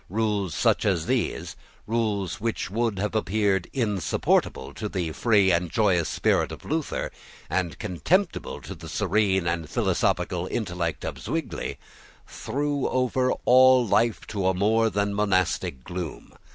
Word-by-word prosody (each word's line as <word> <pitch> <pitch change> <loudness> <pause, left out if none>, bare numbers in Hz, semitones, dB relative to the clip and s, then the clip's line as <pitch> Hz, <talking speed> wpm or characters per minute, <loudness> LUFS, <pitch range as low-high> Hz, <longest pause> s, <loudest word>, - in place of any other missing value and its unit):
Rules 100 -5 -1
such - - +2
as - - +1
these, - - -1 0.3
rules 105 -6 -1
which 115 -4 -2
would 115 -1 0
have 105 +2 -2
appeared 100 -3 +1
insupportable 105 - 0
to 105 - -4
the 90 -5 -2
free 100 0 +3
and 85 0 +1
joyous 90 -5 +2
spirit - - +1
of - - -9
Luther, 155 0 -2 0.4
and 90 -3 -1
contemptible 170 - -1
to - - -7
the - - -10
serene 95 -2 +1
and 85 -2 -2
philosophical 90 0 0
intellect 90 -7 -3
of - - -5
Zwingle, - - -3 0.5
threw 145 0 -2
over 130 0 +1
all 130 0 +6
life 115 +1 +2
a 95 -2 +1
more 110 +4 +3
than 100 -1 -1
monastic 95 -10 0
gloom. 90 -1 -6
105 Hz, 135 wpm, -25 LUFS, 90-115 Hz, 0.5 s, all